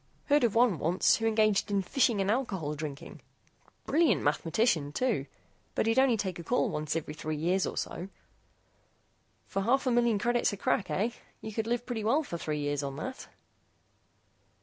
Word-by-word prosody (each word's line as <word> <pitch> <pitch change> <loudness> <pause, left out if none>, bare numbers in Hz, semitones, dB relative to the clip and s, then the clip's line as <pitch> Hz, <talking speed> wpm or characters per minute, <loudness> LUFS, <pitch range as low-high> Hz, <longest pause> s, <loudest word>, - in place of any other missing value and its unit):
Heard 290 -1 +4
of 230 -3 +2
one 230 - +4
once 175 +6 +3
who 225 - 0
engaged 215 -2 +2
in 200 -1 +1
fishing 230 +1 +2
and 195 +1 +1
alcohol 195 - -1
drinking. 145 -2 -7 0.6
Brilliant 325 +1 +3
mathematician, 160 +1 +1
too. 205 - -1 0.5
But - - +1
he'd 225 +3 +3
only 260 -4 +4
take 190 -4 -3
a - - -6
call 245 +9 +1
once 150 0 -2
every 155 -2 -3
three 155 0 -4
years 180 +5 +1
or - - -5
so." 180 +3 -4 1.4
"For - - -3
a 195 - -2
half 270 +4 +2
million 240 -3 +3
credits 240 +3 +1
a - - -5
crack, 190 - 0
eh? 220 +5 0 0.3
You 220 - -7
could 225 +1 -2
live 240 +1 -1
pretty 235 -4 -3
well 270 +9 +2
for 170 - -6
three 150 -2 -3
years 145 0 -1
on 140 -1 -4
that." 255 - -6
205 Hz, 180 wpm, -30 LUFS, 160-240 Hz, 1.4 s, Heard